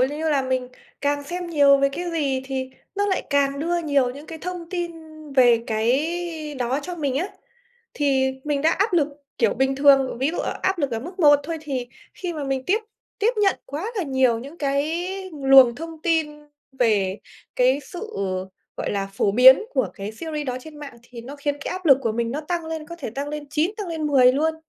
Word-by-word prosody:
lư 295 +5 0
là, 275 -2 +2
mình 255 -1 -1 0.3
càng 285 0 0
xem 355 +3 -5
nhiều 285 -4 +5
về 275 0 +3
cái 345 +5 -4
gì 280 -5 0
thì 265 -1 -4 0.2
nó 405 +1 0
lại 380 - 0
càng 280 0 +2
đưa 345 +3 0
nhiều 285 -6 +1
những 285 +4 -10
cái 325 -1 -8
thông 355 -1 -6
tin 350 -2 -3 0.4
về 240 -3 +5
cái 305 +7 -1
đó 255 +1 -1
cho 355 +2 -5
mình 280 -5 -1
á. 365 +7 -1 0.7
Thì 265 -2 +2
mình 290 -1 -1
đã 320 - +4
áp 405 +1 +1
lực, 305 -3 +3 0.3
kiểu, - - +2
bình 265 +1 +1
thường, 275 -3 +4
ví 270 +4 +1
dụ 350 - -5
ở - - -3
áp 380 -1 +1
lực 280 -4 0
ở 225 - -2
mức 355 +9 -9
1 290 -2 +6
thôi 325 +2 -4
thì 260 -5 -4 0.3
khi 355 -2 -4
mà 300 -3 -4
mình 270 -1 -2
tiếp 405 +4 +3 0.4
tiếp 460 +4 +2
nhận 390 - +3
quá 345 - -5
là 380 - 0
nhiều 260 -5 +2
những 280 +8 -10
cái 295 +5 -1 0.3
luồng 270 -4 +6
thông 325 +1 -8
tin 320 -3 +1 0.4
về 210 -6 +1 0.4
cái 255 +3 +3
sự, 395 +10 -8 0.6
gọi - - -3
là, 195 -1 -1
phổ 200 -2 +2
biến 260 - +8
của 260 - +1
cái 200 +2 -6
series 300 +3 -5
đó 250 0 -2
trên 305 +2 -12
mạng 280 -5 -9
thì 240 -1 -11
nó 270 +5 -9
khiến 285 0 -2
cái - - -4
áp 370 -1 -5
lực 275 -3 +7
của 225 -2 0
mình 230 0 -1
nó 295 +4 -3
tăng 340 +2 -3
lên, 320 -1 -5
có 340 +1 -8
thể 225 - -5
tăng 280 +4 -4
lên 300 0 -5
9, 310 +5 +1
tăng 410 -5 -5
lên 320 -2 -2
10 255 -3 +5
luôn. 315 +3 +1
285 Hz, 220 wpm, -23 LUFS, 260-330 Hz, 0.7 s, biến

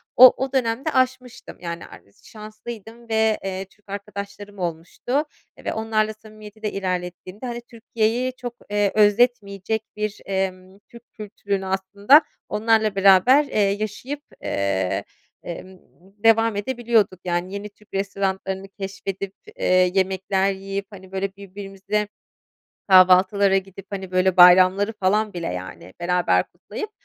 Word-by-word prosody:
o 255 +1 +10
o 270 - -4
dönemde 250 +2 0
aşmıştım, 255 -2 -1
yani, 170 -1 -6
ares 100 - -17
şanslıydım 225 +1 -10
ve, 220 -1 +2
eee, 190 0 -4
Türk 205 +1 -29
arkadaşlarım 200 0 -7
olmuştu 175 - -2 0.4
ve - - -1
onlarla 220 -1 0
samimiyeti 215 0 -14
de 210 - -1
ilerlettiğimde, 185 +2 -4
hani, 240 -1 -5
Türkiye'yi 235 +1 -1
çok, 245 -2 -6 0.2
eee, 205 -1 +1
özletmeyecek 215 -1 +2
bir, 210 0 -4
emm, 190 0 -3
Türk 235 0 -14
kültürünü 200 -2 -4
aslında 200 - +4 0.3
onlarla 220 -1 +2
beraber, 195 +9 +6
eee, 215 - -2
yaşayıp, 215 +8 -1 0.2
eee, 100 0 -1 0.4
emm, 185 +2 -8 0.5
devam 225 -1 +4
edebiliyorduk, 220 -3 +1
yani, 175 +1 -2
yeni 200 +1 -5
Türk 205 0 -26
restoranlarını 195 -1 -2
keşfedip, 195 0 -6 0.2
eee, - - -4 0.3
yemekler 190 0 +1
yiyip, 195 +1 -5
hani, 190 -3 -13
böyle, 195 0 -3
birbirimize 200 +1 -4 0.8
kahvaltılara 190 +1 +6
gidip, 195 0 -5
hani, 195 -2 -6
böyle, 185 0 +2
bayramları 185 +3 +7
falan 210 +1 0
bile, 175 -1 -5
yani, 90 0 -7
beraber 180 0 +2
kutlayıp, 430 -1 -7
200 Hz, 125 wpm, -23 LUFS, 190-220 Hz, 0.8 s, o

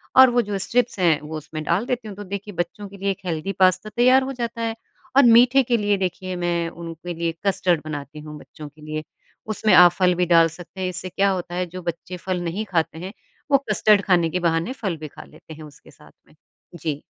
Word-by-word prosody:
और 260 0 +9
वो 245 0 +2
जो 200 - -1
स्ट्रिप्स 230 +2 0
हैं, 165 -4 +3
वो 155 +1 -6
उसमें 155 +1 -7
डाल 175 +9 0
देती 245 -3 -3
हूँ। 205 - -8
तो 205 - -6
देखिए, 200 +2 -6
बच्चों 175 +4 -4
के 200 - -12
लिए 195 +1 -1
एक 190 - -5
हेल्दी 165 +2 -2
पास्ता 185 +3 +3
तैयार 255 +2 +5
हो 270 +1 -4
जाता 235 -1 -4
है 225 0 -2 0.4
और 275 - +8
मीठे 245 +3 +6
के 240 -1 +1
लिए 205 -2 +1
देखिए, 185 0 -3
मैं 170 -1 -1
उनके 170 +1 -8
लिए 170 0 -2
कस्टर्ड 180 -4 +1
बनाती 150 0 -7
हूँ 150 0 -9
बच्चों 150 0 -11
के 155 +1 -21
लिए। 155 0 -5 0.5
उसमें 210 -1 +2
आप 180 -1 +8
फल 180 +1 +2
भी 180 +1 +1
डाल 165 -1 +5
सकते 175 +3 -11
हैं, 185 - -1
इससे 185 0 -6
क्या 195 +2 +1
होता 180 -2 -3
है, 180 0 -1
जो 180 +1 -9
बच्चे 170 +1 -5
फल 180 0 -3
नहीं 180 +6 -3
खाते 160 -2 0
हैं, 185 +3 -7 0.4
वो 275 - +7
कस्टर्ड 210 -1 +4
खाने 175 -4 +3
के 180 - -2
बहाने 170 +6 0
फल 195 -10 -4
भी 155 0 -7
खा - - -12
लेते 155 +1 -14
हैं 155 0 -11
उसके 150 -2 -15
साथ - - -19 0.2
में। - - -23 0.4
जी। 155 -4 -4
180 Hz, 235 wpm, -22 LUFS, 165-205 Hz, 0.5 s, और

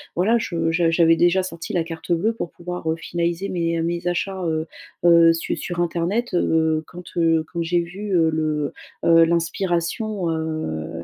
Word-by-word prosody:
voilà, 220 +7 +3
je 165 -5 -1
je 165 0 +2
j'avais 165 0 +4
déjà 175 +3 +3
sorti 165 -2 -6
la 175 - +1
carte 165 +1 -7
bleue 195 +7 +2
pour 200 -6 -5
pouvoir, 175 -1 -5
heu, 160 - +1
finaliser 170 +3 -2
mes, 170 -2 -1
heu, - - 0
mes 170 +1 -2
achats, 185 +2 -2
heu 160 -1 -1 0.4
heu, 170 -1 +7
su 165 - -2
sur 175 -1 -5
internet, 175 +7 -1
heu, 160 -2 +2
quand, 180 0 -10
heu, 165 -1 +3
quand 170 - -2
j'ai 170 +1 +1
vu, 195 +4 -6
heu, 160 -1 +3
le 155 -2 -1 0.3
heu, 165 0 +6
l'inspiration, 170 +3 -1
heu, 85 - -4
170 Hz, 180 wpm, -22 LUFS, 165-175 Hz, 0.4 s, heu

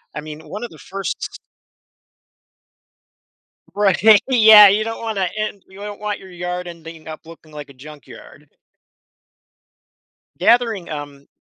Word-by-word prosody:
I 150 - -5
mean, 155 0 -10
one 210 +4 -7
of 240 - -6
the 160 - -15
1st 195 0 -6 2.4
Right, 200 -2 +1 0.3
yeah, 220 -4 +8
you 205 +2 +1
don't 225 +1 -6
wanna 200 -5 -2
end 215 -2 -5
you 190 +1 -16
don't 205 0 -8
want 210 -1 -4
your 190 - -14
yard 180 0 -5
ending 165 -2 -12
up 155 +1 -10
looking 165 -1 -15
like 150 -1 -9
a 140 - -16
junkyard. 145 +2 -15 1.9
Gathering 220 -2 +1
um 145 -2 -8
185 Hz, 130 wpm, -19 LUFS, 155-210 Hz, 2.4 s, yeah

